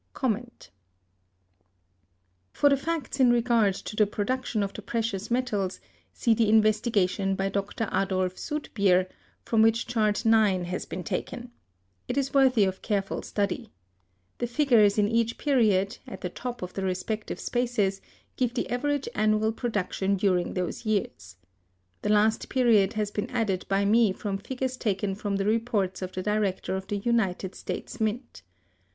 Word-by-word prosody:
For 285 Hz, -, +4 dB
the 280 Hz, -, +4 dB
facts 290 Hz, -2 st, -3 dB
in 255 Hz, -2 st, +6 dB
regard 230 Hz, -4 st, +3 dB
to 210 Hz, -, -7 dB
the 210 Hz, -1 st, +4 dB
production 220 Hz, +1 st, -1 dB
of 200 Hz, 0 st, -4 dB
the -, -, -7 dB
precious 225 Hz, -4 st, -3 dB
metals, 220 Hz, -6 st, -1 dB, 0.3 s
see 235 Hz, -, +2 dB
the 220 Hz, -1 st, +2 dB
investigation 210 Hz, -3 st, +2 dB
by 195 Hz, 0 st, -1 dB
Dr. 200 Hz, +3 st, -2 dB
Adolf 185 Hz, -1 st, 0 dB
Soetbeer,(230) 200 Hz, -, 0 dB, 0.4 s
from 225 Hz, -2 st, +2 dB
which 225 Hz, +1 st, +3 dB
Chart 220 Hz, -2 st, 0 dB
IX 215 Hz, -5 st, +4 dB
has 180 Hz, -, -4 dB
been 180 Hz, -, -5 dB
taken. 245 Hz, +7 st, -4 dB, 0.6 s
It 255 Hz, -, -3 dB
is 275 Hz, -1 st, 0 dB
worthy 260 Hz, -5 st, +5 dB
of 190 Hz, -1 st, -1 dB
careful 200 Hz, -3 st, -1 dB
study. 200 Hz, -2 st, -2 dB, 0.7 s
The 240 Hz, -, -1 dB
figures 235 Hz, -6 st, +4 dB
in 205 Hz, -1 st, +3 dB
each 230 Hz, +1 st, 0 dB
period, 215 Hz, -9 st, +2 dB
at -, -, -8 dB
the 180 Hz, -, -3 dB
top 245 Hz, +3 st, -6 dB
of 180 Hz, -, -6 dB
the 195 Hz, -, -4 dB
respective 190 Hz, +4 st, -3 dB
spaces, 225 Hz, -6 st, 0 dB, 0.4 s
give 250 Hz, -1 st, 0 dB
the 240 Hz, -, -2 dB
average 285 Hz, +3 st, -1 dB
annual 215 Hz, +1 st, +2 dB
production 200 Hz, -4 st, -1 dB
during 185 Hz, -2 st, +1 dB
those 180 Hz, +3 st, -3 dB
years. 195 Hz, -, -2 dB, 0.7 s
The -, -, -2 dB
last 215 Hz, +1 st, +2 dB
period 225 Hz, -6 st, +3 dB
has 210 Hz, -1 st, -2 dB
been 205 Hz, -, -3 dB
added 215 Hz, -7 st, -1 dB
by 195 Hz, 0 st, +2 dB
me 215 Hz, -1 st, +4 dB
from 195 Hz, 0 st, -4 dB
figures 260 Hz, +3 st, -4 dB
taken 200 Hz, -3 st, -1 dB
from 200 Hz, 0 st, -3 dB
the 195 Hz, 0 st, -1 dB
reports 215 Hz, -4 st, 0 dB
of 185 Hz, 0 st, -4 dB
the 185 Hz, -, -4 dB
Director 210 Hz, -2 st, -1 dB
of 190 Hz, 0 st, -5 dB
the 205 Hz, -, -2 dB
United 200 Hz, -4 st, 0 dB
States 240 Hz, -, -6 dB
Mint. 220 Hz, -, -2 dB
215 Hz, 155 wpm, -27 LUFS, 195-235 Hz, 0.7 s, in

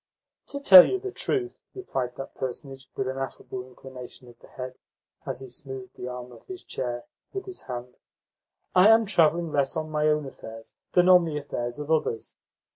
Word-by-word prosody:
"To 280 Hz, -, -5 dB
tell 190 Hz, -10 st, +11 dB
you 385 Hz, -, 0 dB
the 390 Hz, 0 st, -5 dB
truth," 375 Hz, -1 st, -2 dB
replied 130 Hz, -, -3 dB
that 135 Hz, -, -7 dB
personage 130 Hz, 0 st, -6 dB
with 130 Hz, -, -2 dB
an 130 Hz, +1 st, -3 dB
affable 130 Hz, -1 st, -5 dB
inclination 130 Hz, 0 st, -12 dB
of 120 Hz, -1 st, -16 dB
the -, -, -17 dB
head 130 Hz, -1 st, -7 dB, 0.5 s
as -, -, -4 dB
he 130 Hz, -, -8 dB
smoothed 130 Hz, 0 st, -8 dB
the 125 Hz, -, -6 dB
arm 125 Hz, 0 st, -7 dB
of -, -, -16 dB
his 375 Hz, -1 st, -8 dB
chair 120 Hz, -1 st, -4 dB, 0.3 s
with 390 Hz, -1 st, -4 dB
his 380 Hz, -2 st, -7 dB
hand, 125 Hz, 0 st, -6 dB, 0.8 s
"I 185 Hz, +2 st, +7 dB
am 225 Hz, 0 st, +6 dB
travelling 170 Hz, -4 st, +3 dB
less 140 Hz, -2 st, +1 dB
on 155 Hz, 0 st, -3 dB
my 150 Hz, 0 st, +1 dB
own 150 Hz, -1 st, +2 dB
affairs 115 Hz, -4 st, -10 dB, 0.2 s
than 180 Hz, 0 st, +5 dB
on 180 Hz, -2 st, +7 dB
the 155 Hz, -2 st, -3 dB
affairs 120 Hz, -4 st, -4 dB
of 150 Hz, +1 st, -5 dB
others. 150 Hz, -8 st, 0 dB
135 Hz, 190 wpm, -26 LUFS, 125-175 Hz, 0.8 s, tell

